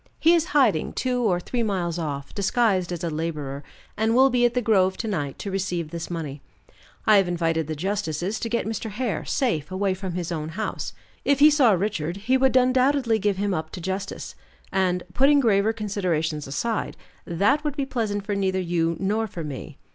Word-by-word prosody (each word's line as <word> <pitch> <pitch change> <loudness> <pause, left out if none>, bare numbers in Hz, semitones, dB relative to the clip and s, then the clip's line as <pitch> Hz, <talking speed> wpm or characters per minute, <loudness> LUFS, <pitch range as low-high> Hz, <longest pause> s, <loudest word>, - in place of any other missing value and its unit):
He 330 - +5
is 335 -2 +3
in - - -11
hiding 265 - +3
two 250 -1 -1
or 190 -7 +2
three 235 +7 -3
miles 180 -6 -1
off, 140 -4 -4
disguised 200 -3 +1
as 175 -1 -4
a 170 - 0
laborer, 150 -3 -4 0.3
and 220 +2 +1
will 265 +1 +6
be 245 0 +3
at 240 - +1
the - - +3
grove 190 -4 +3
to 225 - -3
night 145 -10 -2
to 200 - -5
receive 180 -4 -2
this 170 -1 -5
money. 150 -5 -5 0.6
I 215 -1 +6
have 195 -2 +3
invited 165 -3 0
the 155 - -3
justices 190 +2 -2
to 230 - -3
get 235 -2 0
Mr. 220 0 -3
Hare 220 +1 -2
safe 190 - 0
away 190 +1 0
from 185 -1 -5
his 175 -1 -3
own 155 -2 -3
house. 210 +6 -4 0.3
If 280 - +3
he 300 +2 +7
saw 270 -7 +5
Richard, 180 -3 -1
he 225 +6 +1
would 260 0 +4
undoubtedly 255 -2 +3
give 205 -1 0
him 200 0 0
up 160 -2 -3
to - - -5
justice, 190 +3 -4 0.4
and 185 -2 +1
putting 280 +5 +5
graver 215 -4 +3
considerations 180 -9 -2
aside 220 +11 -2 0.3
that 205 - +2
would 295 -1 -3
be 280 - 0
pleasant 215 -6 -2
for 205 - -2
neither 190 -1 0
you 170 -2 0
nor 215 +3 0
for 175 -5 -6
me. 145 0 -7
195 Hz, 200 wpm, -24 LUFS, 170-230 Hz, 0.6 s, he